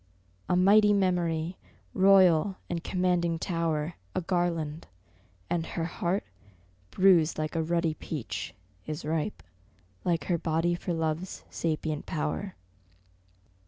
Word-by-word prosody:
A - - +3
mighty 205 +3 +6
memory, 175 -3 0 0.4
royal 190 -2 +5 0.2
and 170 -1 -2
commanding 180 -2 +1
tower, 165 -2 -1 0.2
A - - +1
garland: 170 -3 -1 0.6
and 170 -1 0
her 165 0 -3
heart, 175 +3 -1 0.7
bruised 175 - +4
like 155 +1 -3
a 165 - +1
ruddy 170 0 0
peach, 115 - -5 0.3
Is 155 -1 -5
ripe 160 +5 -2 0.6
like 170 -4 0
her 170 +1 0
body 165 +1 +1
for 175 +1 -3
Love's 165 +2 -2
sapient 155 -2 -2
power. 165 +5 -3
170 Hz, 115 wpm, -28 LUFS, 160-180 Hz, 0.7 s, mighty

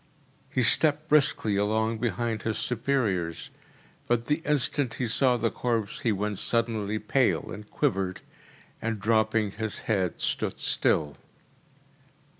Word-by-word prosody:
He 130 - 0
stepped 155 +5 +4
briskly 135 -8 +3
along 110 +2 0
behind 115 -2 -1
his 110 -1 -2
superiors, 110 -9 -1 0.6
but 120 -1 +1
the 150 +4 0
instant 140 -4 +1
he 125 - -2
saw 125 +2 +3
the 115 -1 0
corpse 115 +3 -2
he 125 -7 +1
went 105 0 -2
suddenly 110 -3 0
pale, 120 +4 +1
and 105 0 -9
quivered; 95 -1 -1 0.6
and 115 -1 -2
dropping 110 0 +1
his 110 +1 -5
head 95 -6 -1
stood - - -2
still. 75 -1 +1
110 Hz, 125 wpm, -27 LUFS, 105-125 Hz, 0.6 s, stepped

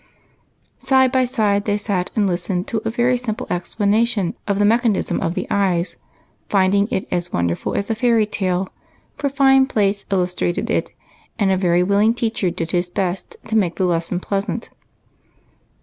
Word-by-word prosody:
Side 260 -1 +3
by 260 -1 +3
side 210 -5 0
they 205 -1 +1
sat 195 -3 -2
and 210 - +2
listened 180 0 -1
to 220 - -1
a - - +1
very 240 +2 +1
simple 225 -3 -4
explanation 205 +2 0
of 200 -1 +1
the 205 - +3
mechanism 225 -1 +1
of 165 +2 -1
the - - -2
eye, 185 -4 +2 0.6
finding 200 +1 +3
it 190 - -2
as 175 0 -2
wonderful 85 0 -1
as 200 - -1
a - - +2
fairy 230 -1 +2
tale, 190 -2 -2 0.5
for 285 - -1
fine 270 -1 +4
plates 200 -4 0
illustrated 180 -2 -1
it, - - -1 0.5
and 200 -2 +2
a - - +3
very 180 -1 +2
willing 205 +4 +3
teacher 225 -5 -1
did 165 -1 -4
his 175 0 0
best 185 0 -3
to 220 - -3
make 185 -6 +2
the 190 - 0
lesson 170 0 0
pleasant. 200 +4 -3
200 Hz, 165 wpm, -20 LUFS, 180-225 Hz, 0.6 s, fine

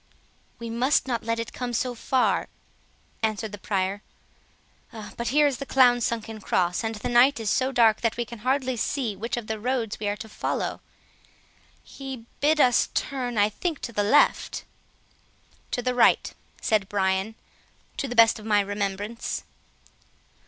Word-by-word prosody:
"We 230 -1 -6
must 255 +5 +2
not 235 -3 -1
let 230 0 0
it 230 -1 -5
come 245 -1 -4
so 250 +2 -1
far," 255 +2 +1 0.7
answered 220 -1 -1
the 205 - -8
Prior; 195 0 -1 1.1
"but 235 - -4
here 295 +3 +4
is 280 -3 +1
the 275 - -4
clown's 245 -3 +4
sunken 225 -1 -5
cross, 180 +1 0
and 225 0 -2
the 210 - -4
night 245 +3 +5
is 215 -2 -1
so 260 0 +1
dark 230 -4 +4
that 230 -1 0
we 240 - -1
can 235 -1 -10
hardly 260 +1 0
see 230 -2 -1
which 230 +5 -3
of 240 - -4
the 220 0 -4
roads 235 -2 -2
we 210 - -3
are 205 - 0
to 220 +1 -8
follow. 215 - -3 1.0
He 265 -4 -8
bid 305 +2 +3
us 245 -4 +4
turn, 250 -4 -2
I 205 0 +4
think 320 - -3
to 235 - -6
the 205 - +1
left." 210 +8 +3 1.1
"To 245 - -2
the 250 0 0
right," 245 - +3 0.3
said 210 -3 +1
Brian, 190 +2 0 0.6
"to 275 - -2
the 245 - -5
best 230 -1 +6
of 215 - -11
my 210 -1 +4
remembrance." 205 +2 -3
230 Hz, 165 wpm, -25 LUFS, 210-250 Hz, 1.1 s, best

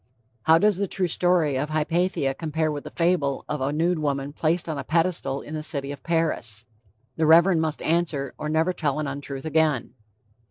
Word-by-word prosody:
How 160 +1 +6
does 205 +2 +3
the 200 0 -1
true 185 0 0
story 170 -4 +2
of 150 +3 -2
Hypatia 155 -2 0
compare 155 +1 -2
with 145 -1 -6
the - - -6
fable 165 -6 0
of 150 - -3
"a 135 +2 0
nude 165 +3 +1
woman 140 -1 -2
placed 165 +3 0
on 155 -3 -3
a - - -4
pedestal 160 -5 0
in 150 - -9
the 155 - -3
city 140 -2 -2
of 145 - -8
Paris?" 150 -10 -1 0.5
The 160 - +2
Reverend 165 +1 +6
must 160 -1 -2
answer, 155 -5 0
or 150 - -3
never 160 +4 +1
tell 150 -5 -1
an 155 - -1
untruth 140 0 -6
again. 155 -6 +1
155 Hz, 195 wpm, -24 LUFS, 140-170 Hz, 0.5 s, How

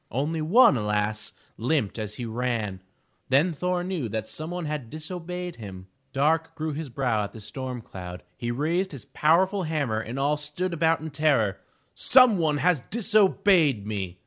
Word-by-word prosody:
Only 150 +6 -1
one, 165 - +6
alas! 105 0 -1 0.3
limped 120 -3 0
as 105 -1 -4
he 120 - -5
ran. 115 -5 -2 0.5
Then 145 +7 +3
Thor 180 +3 -1
knew 180 -10 -3
that 110 +1 -3
some 155 +6 -6
one 175 -1 -4
had 150 -6 -4
disobeyed 175 +3 -6
him. 95 -4 -9 0.2
Dark 160 +4 +1
grew 155 -1 -3
his 150 0 -5
brow 120 -4 0
as 100 - -8
the 115 - -9
storm 125 +2 -6
cloud; 90 -2 -8
he 120 +5 -4
raised 165 +9 0
his 130 -7 -9
powerful 185 +6 +2
hammer 150 -10 -1
and 115 +3 -5
all 145 +2 +1
stood 150 +5 -4
about 165 0 +2
in 160 0 -6
terror. 140 -10 +2 0.3
"Some 250 -6 +5
one 155 -3 +2
has 170 -2 +2
disobeyed 195 - +3
me!'' 95 -4 -4
145 Hz, 170 wpm, -26 LUFS, 110-165 Hz, 0.5 s, one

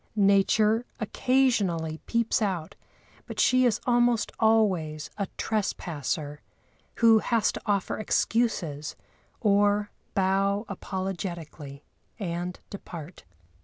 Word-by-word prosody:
Nature 210 +2 +3 0.2
occasionally 205 -10 +1
peeps 235 -1 +1
out, 185 -6 -2 0.5
but - - -7
she 255 0 +4
is 220 -2 +1
almost 240 -2 +2
always 185 -10 +2
a 200 - -1
trespasser, 155 - -2 0.5
who 225 -1 +6
has 225 -1 +1
to - - -7
offer 200 -1 0
excuses, 200 -10 0 0.5
or 205 -1 +3 0.2
bow 195 +2 +1
apologetically 175 -7 -5 0.4
and 175 -2 -4
depart. 170 - -9
200 Hz, 90 wpm, -27 LUFS, 170-220 Hz, 0.5 s, who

